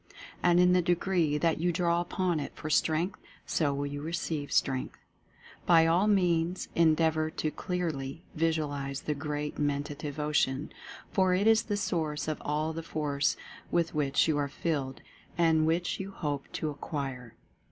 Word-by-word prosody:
And 175 0 +4
in 180 0 +5
the 180 - +4
degree 175 -3 +1
that 165 0 +1
you 175 +2 +2
draw 170 0 +1
upon 175 -1 -1
it 140 - -5
for 155 - -5
Strength, 165 +5 +1 0.3
so 150 -4 +1
will 140 +1 -2
you 145 0 -5
receive 160 -2 -3
Strength. 130 -2 0 0.7
By 165 -2 +6
all 175 +5 +3
means 180 -3 +1
endeavor 160 -1 +3
to 155 -1 -2
clearly 160 -5 -3
visualize 150 -4 -1
this 150 - -2
Great 150 0 -4
Men 145 -1 +1
tative 145 0 -6
Ocean, 150 -1 0 0.4
for 185 -2 +3
it 195 +3 +1
is 225 0 +6
the 205 -2 -2
source 160 -7 -1
of 155 - -3
all 155 +2 -1
the 165 - -4
Force 150 -3 -1 0.3
with 170 -1 +1
which 145 -1 +2
you 155 -2 +1
are 145 - 0
filled 140 -2 -3 0.3
and 160 -2 +3
which 170 +2 0
you 195 0 -4
hope 145 -7 -4
to 155 - -2
ac 145 - -11
quire. 130 -6 -5
155 Hz, 165 wpm, -30 LUFS, 145-175 Hz, 0.7 s, By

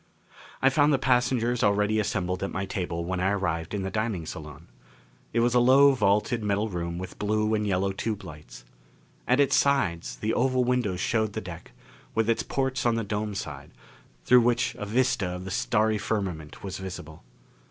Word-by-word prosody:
I 135 - +6
found 145 +2 +4
the 140 - +4
passengers 125 -2 +1
already 105 +1 +2
assembled 95 -3 -1
at 100 - -2
my 95 +1 -3
table 85 -3 -3
when 90 +1 -2
I 95 +1 +1
arrived 90 -3 -2
in 100 - -2
the 95 - -3
dining 110 -5 -2
salon. 75 -2 -9 0.7
It 115 - +1
was 120 0 +2
a 125 - +5
low 135 +3 +6
vaulted 110 -1 +1
metal 105 +1 0
room 85 -2 -4
with 90 0 -8
blue 105 +1 0
and 105 -1 0
yellow 95 0 +1
tube 105 +2 -3
lights. - - -11 0.6
At 125 +2 +3
its 140 -2 +4
sides 95 -13 +1
the 110 +1 -2
oval 130 0 +2
windows 120 -7 0
showed 110 -1 0
the 110 - -2
deck, 90 -4 -10 0.4
with 115 0 +2
its 115 - 0
ports 130 -2 -1
on 120 -1 +2
the 115 - -1
dome 105 0 -3
side, - - -6 0.6
through 125 0 +6
which 120 +1 +1
a 105 - -4
vista 120 -3 +1
of 90 +1 -5
the 95 - -6
starry 110 -1 +1
firmament 95 -8 -4
was 95 -1 -5
visible. 85 -5 -8
105 Hz, 185 wpm, -27 LUFS, 95-120 Hz, 0.7 s, I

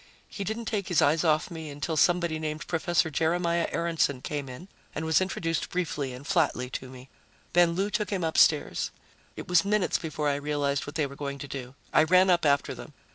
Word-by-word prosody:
He 200 - -6
didn't 220 +4 -4
take 205 -4 -2
his 175 -4 +2
eyes 155 +3 +3
off 155 -1 +2
me 160 -2 -6
until 145 +3 -3
somebody 170 0 +2
named 155 0 -4
Prof. 175 0 +1
Jeremiah 170 +2 +1
Aaronson 165 -5 0
came 145 -3 -4
in 130 +9 -9 0.3
and 155 - -3
was 160 +3 +3
introduced 165 -3 -2
briefly 150 -6 -2
and 125 +3 -9
flatly 145 -7 0
to 130 - -6
me. 130 0 -12 0.5
Then 175 -1 +5
Lou 195 +4 -1
took 210 -1 -1
him 190 -4 -2
upstairs. 160 -1 +3 0.5
It - - -8
was 180 -2 +4
minutes 205 -1 +1
before 155 -2 -3
I 140 -1 +1
realized 145 -1 -1
what 145 - -8
they 155 - +1
were 140 0 -8
going 140 -1 -5
to 140 - -7
do. 130 -1 -7 0.2
I - - +6
ran 185 +4 +5
up 170 -3 +3
after 140 -1 +2
them. - - -11
160 Hz, 205 wpm, -27 LUFS, 145-175 Hz, 0.5 s, I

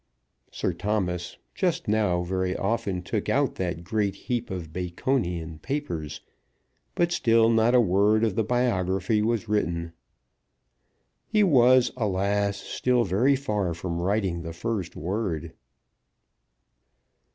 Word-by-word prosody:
Sir - - -2
Thomas 90 -5 -2 0.2
just 175 -5 -1
now 105 -5 +1
very 95 +1 -1
often 100 -3 -1
took - - -2
out - - +2
that 85 -2 -3
great 100 +1 -1
heap 120 -1 -3
of 85 -4 -6
Baconian 90 - -2
papers, 80 - -4 0.7
but 170 0 +1
still 115 -6 +4
not 115 +2 +3
a - - +7
word 105 +1 +3
of 110 -4 +2
the 110 - +1
biography 105 -4 +1
was 115 0 0
written. 85 -5 -1 1.3
He 215 -1 +3
was, 130 -7 +5
alas! 100 -2 0
still 125 +4 0
very 115 +9 +2
far 105 -10 -1
from 85 0 -4
writing 95 -2 0
the 85 -1 -6
first 100 0 -3
word. 90 -2 -3
100 Hz, 120 wpm, -26 LUFS, 90-115 Hz, 1.3 s, a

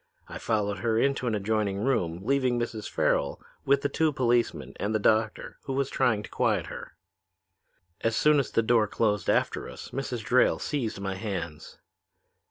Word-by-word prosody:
I - - -7
followed 105 -3 -1
her 110 +3 +1
into 135 0 +1
an 110 - +1
adjoining 105 -1 0
room, 90 -10 0
leaving 130 -2 +2
Mrs. 115 -3 -4
Farrel - - 0 0.3
with 140 0 +3
the - - +3
two 155 +2 +1
policemen 120 -3 0
and 105 +2 -1
the - - +2
doctor, 110 +1 0
who 135 - -3
was 135 0 -1
trying 110 -3 +1
to - - -9
quiet - - +1
her. - - -9 1.1
"As 115 -1 +1
soon 150 +3 +4
as 135 - -1
the 115 - +1
door 110 -1 +3
closed 105 -3 0
after - - 0
us - - -10
Mrs. 125 -4 -4
Drayle 125 - +4
seized 120 -8 -3
my 100 -1 -3
hands. 95 -6 -5
115 Hz, 175 wpm, -27 LUFS, 105-130 Hz, 1.1 s, soon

